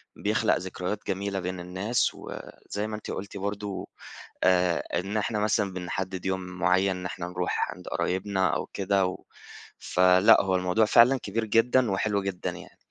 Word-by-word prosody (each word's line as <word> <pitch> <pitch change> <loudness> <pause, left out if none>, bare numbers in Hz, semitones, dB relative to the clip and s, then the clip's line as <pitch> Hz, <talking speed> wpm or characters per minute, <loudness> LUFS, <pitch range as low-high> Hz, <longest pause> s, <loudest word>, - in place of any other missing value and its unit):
بيخلق - - +1
ذكريات 95 +2 -4
جميلة 100 +1 -2
بين 90 0 -4
الناس 95 +7 0
وزي 105 +1 -7
ما 110 - -4
أنتِ 105 - -7
قُلتِ 100 +1 -6
برضه 100 0 -4 0.6
آآ 90 -2 +3 0.2
إن 100 +4 -3
إحنا 105 0 -1
مثلًا 105 -2 +1
بنحدد 95 +1 -4
يوم 95 0 -1
معين 90 +1 +1
إن 90 - -7
إحنا 85 0 -4
نروح 90 0 -1
عند - - -12
قرايبنا 95 0 0
أو - - -2
كده 100 -1 +1
و 95 - -6 0.6
فلأ 90 +2 +5
هو 95 -1 0
الموضوع 90 +4 +2
فعلًا 125 +5 +6
كبير 110 +3 -2
جدًا 115 +2 +3
وحلو 100 +1 0
جدًا 95 -2 -3
يعني. - - -12
95 Hz, 160 wpm, -27 LUFS, 90-105 Hz, 0.6 s, فعلًا